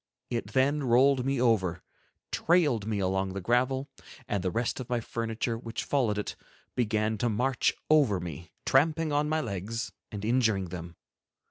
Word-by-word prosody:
It 120 -1 -3
then 140 +3 +3
rolled 130 +1 +4
me 135 -2 +1
over, 95 -8 +2 0.5
trailed 145 - +2
me 110 -2 -1
along 95 0 0
the 100 - -3
gravel, 125 +6 +1 0.4
and 100 -3 -1
the 95 - +1
rest 115 +6 -1
of 130 -1 -6
my 120 -1 +1
furniture, 115 0 -3
which 115 -1 -5
followed 120 -7 +1
it, 105 - -3 0.4
began 110 -2 0
to 120 - +1
march 125 +4 +1
over 140 -11 +4
me, 85 -1 -7 0.2
tramping 155 +3 +3
on 150 +1 +1
my 155 0 +1
legs 110 +1 -4 0.2
and 105 -1 -5
injuring 110 -6 +2
them. 85 -1 -7
115 Hz, 160 wpm, -29 LUFS, 100-130 Hz, 0.5 s, rolled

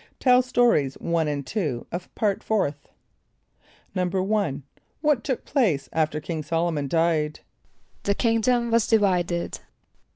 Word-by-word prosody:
(Tell 250 -1 +5
Stories 240 - +2
1 165 -2 -1
and 145 -2 -2
2 150 - -2
of 175 +1 -6
Part 205 -3 0
Fourth.) 150 -10 -1 1.1
=1.= 185 -4 0 0.4
What 295 -6 +2
took 260 -4 -3
place 200 - +1
after 155 -1 0
King 160 +1 -4
S[)o]l´o 165 +2 0
mon 145 -2 -2
died? 160 -1 +1 0.6
=The 200 - 0
kingdom 235 +1 +1
was 230 -2 +3
divided. 180 -5 +1
180 Hz, 125 wpm, -25 LUFS, 155-225 Hz, 1.1 s, Tell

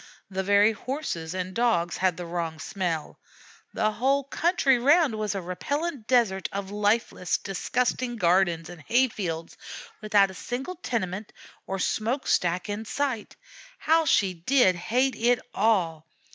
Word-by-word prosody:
The 190 0 -1
very 205 +2 +4
Horses 220 - -4
and 185 0 -3
Dogs 175 -7 +1
had 185 -2 +1
the 175 - -5
wrong 165 -2 -3
smells; 165 -1 -3 0.5
the 215 -1 +1
whole 270 +5 +1
country 275 -2 +2
round 290 +1 +4
was 215 -2 -2
a 195 - -2
repellent 285 - -3
desert 220 -7 +2
of 195 0 -5
lifeless, 205 -2 0
disgusting 245 +5 -1
gardens 175 -3 +2
and 175 -2 -11
hay 245 - +2
fields, 165 -6 -5 0.5
without 205 -2 +3
a - - -11
single 255 - -5
tenement 210 - -3 0.4
or 195 - -2
smoke 225 +7 -1
stack 175 +1 +1
in 205 +1 -3
sight. 245 0 -3 0.4
How 320 +1 +3
she 195 -10 +3
did 185 +4 +3
hate 250 +10 0
it 240 +2 +3 0.2
all! 175 -7 +1
205 Hz, 145 wpm, -26 LUFS, 180-245 Hz, 0.5 s, very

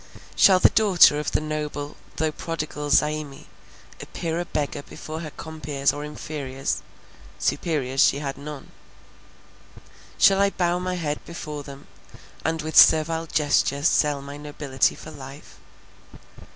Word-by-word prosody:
Shall 190 -2 +6
the - - +5
daughter 185 -8 +5
of 150 - -3
the - - +1
noble, 150 -1 -4 0.2
though 160 -1 0
prodigal 150 -2 -5
Zaimi, 150 -1 +1 0.6
appear 165 0 -4
a 175 - -2
beggar 145 -2 -3
before 155 +2 -8
her 160 -2 -6
compeers 150 -3 -2
or 145 - -6
inferiors—superiors 135 - -3
she - - +3
had 140 -1 -4
none. 145 0 -9 1.5
Shall 195 0 +5
I 200 - +4
bow 175 -2 0
my 180 0 -2
head 150 -4 -3
before 150 -3 -7
them, 140 -1 -11 0.6
and 160 -1 -1
with 155 0 -5
servile 160 +1 +6
gesture 145 -2 +1
sell 150 -3 +2
my 140 +1 -8
nobility 145 -3 -1
for 155 - -11
life? 140 0 -12
150 Hz, 130 wpm, -24 LUFS, 145-160 Hz, 1.5 s, Shall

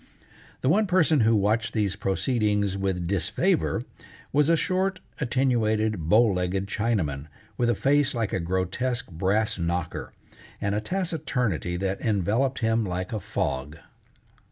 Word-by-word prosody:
The - - 0
one 205 +8 +3
person 165 -5 +3
who 115 -1 +4
watched 110 +2 +1
these 100 -3 0
proceedings 105 -1 0
with 95 -3 -1
disfavor 95 0 0 0.5
was 150 +2 +3
a 165 - +5
short, 185 +2 0 0.2
attenuated, 110 - +1
bow 110 +6 +6
legged 95 -2 0
Chinaman, 100 -10 -1 0.3
with 120 -1 +1
a 120 - +2
face 145 -1 +2
like 115 -4 -1
a - - +1
grotesque 95 +7 -2
brass 100 +6 0
knocker, 85 -1 -3 0.5
and 100 0 -1
a 105 - 0
taciturnity 125 - -1
that 95 +1 -2
enveloped 110 +5 0
him 115 0 +2
like 90 +1 -3
a 110 - -1
fog. 75 -4 -3
110 Hz, 135 wpm, -26 LUFS, 95-125 Hz, 0.5 s, bow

